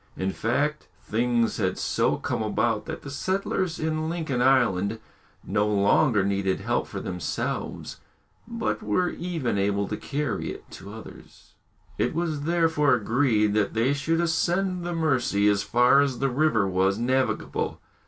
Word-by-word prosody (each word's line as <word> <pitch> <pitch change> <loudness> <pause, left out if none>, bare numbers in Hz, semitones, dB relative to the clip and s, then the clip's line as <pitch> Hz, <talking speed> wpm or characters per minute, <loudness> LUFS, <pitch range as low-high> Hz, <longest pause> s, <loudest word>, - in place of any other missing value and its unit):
In 95 +1 -1
fact, 145 +9 -1 0.2
things 120 +1 0
had - - -1
so - - +1
come - - -3
about 110 0 0
that - - -6
the 140 - -7
settlers 185 +2 -1
in 155 0 -1
Lincoln 155 -7 -2
Island 115 -6 +3 0.5
no 105 +1 0
longer 105 +2 +3
needed 100 -1 0
help - - -1
for - - -6
themselves, 90 -2 -4 0.5
but 230 -1 -2
were 180 -4 +1
even 160 - -2
able 100 0 0
to 105 - -3
carry 140 -8 -3
it - - -9
to 100 - -10
others. 110 +1 -13 0.5
It - - 0
was 160 -4 -2
therefore 160 -4 +3
agreed 110 -2 +2
that 105 -1 0
they 120 +5 +2
should 165 +4 0
ascend 175 +2 0
the 175 0 -3
Mercy 125 -10 +1
as 100 -1 +3
far 125 +5 +4
as 135 -3 0
the 135 +2 0
river 125 -7 +2
was 95 +1 +1
navigable. 130 +3 -1
125 Hz, 150 wpm, -25 LUFS, 105-160 Hz, 0.5 s, far